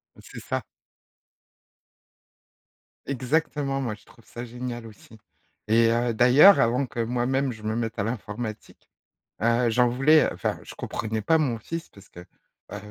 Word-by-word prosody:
Bah, -, -, -16 dB
c'est -, -, -10 dB
ça. -, -, -4 dB, 2.4 s
Exactement, 140 Hz, +1 st, -1 dB
moi, 120 Hz, -4 st, -2 dB
je 105 Hz, -, -23 dB
trouve 115 Hz, -, -21 dB
ça 120 Hz, -, -8 dB
génial 120 Hz, -1 st, -6 dB
aussi 110 Hz, +1 st, -16 dB, 0.5 s
et 115 Hz, +1 st, +4 dB
heu, 120 Hz, 0 st, 0 dB
d'ailleurs, 130 Hz, -, +7 dB
avant 125 Hz, +4 st, +1 dB
que 120 Hz, -1 st, -4 dB
moi-même 125 Hz, +3 st, 0 dB
je 115 Hz, -, -11 dB
me 110 Hz, +1 st, -2 dB
mette 115 Hz, -1 st, -3 dB
à 100 Hz, -, +1 dB
l'informatique, 110 Hz, -1 st, -6 dB, 0.5 s
heu, 115 Hz, +1 st, +2 dB
j'en 125 Hz, +2 st, +3 dB
voulais 140 Hz, +6 st, +4 dB
enfin, -, -, -3 dB
je -, -, -11 dB
comprenais 110 Hz, -1 st, -4 dB
pas 160 Hz, +10 st, +3 dB
mon 135 Hz, -7 st, 0 dB
fils 165 Hz, +9 st, -6 dB
parce 100 Hz, -1 st, -18 dB
que, 85 Hz, -, -13 dB, 0.5 s
heu, -, -, -4 dB
120 Hz, 155 wpm, -25 LUFS, 115-130 Hz, 2.4 s, d'ailleurs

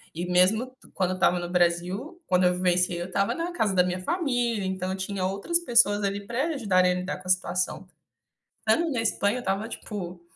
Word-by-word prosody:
E, 170 Hz, +2 st, -3 dB
mesmo 185 Hz, +7 st, +3 dB
t 255 Hz, +1 st, -20 dB
quando 185 Hz, -1 st, 0 dB
eu -, -, -2 dB
estava 180 Hz, -1 st, +2 dB
no 175 Hz, 0 st, -5 dB
Brasil, 180 Hz, -, 0 dB
quando 180 Hz, 0 st, +3 dB
eu 180 Hz, -, +4 dB
vivenciei, 180 Hz, -1 st, +1 dB
eu 175 Hz, -, -4 dB
estava 200 Hz, +2 st, 0 dB
na 335 Hz, +1 st, -3 dB
casa 215 Hz, -, 0 dB
da 180 Hz, -, +5 dB
minha 180 Hz, 0 st, -2 dB
família. 245 Hz, -, 0 dB
Então 190 Hz, 0 st, -2 dB
eu 190 Hz, -, -3 dB
tinha 190 Hz, 0 st, -3 dB
outras 200 Hz, -, 0 dB
pessoas 235 Hz, -9 st, +3 dB
ali 200 Hz, 0 st, -2 dB
pra 240 Hz, +6 st, -1 dB
ajudarem 190 Hz, -, +2 dB
a -, -, -2 dB
lidar 180 Hz, +1 st, -3 dB
com 185 Hz, -, -13 dB
a -, -, -6 dB
situação. 185 Hz, 0 st, -1 dB, 0.7 s
Estando 335 Hz, -1 st, +1 dB
na 245 Hz, -4 st, 0 dB
Espanha, 220 Hz, 0 st, +1 dB
eu -, -, -3 dB
estava, 195 Hz, 0 st, -2 dB
tipo, 185 Hz, -7 st, -7 dB
190 Hz, 215 wpm, -26 LUFS, 180-235 Hz, 0.7 s, da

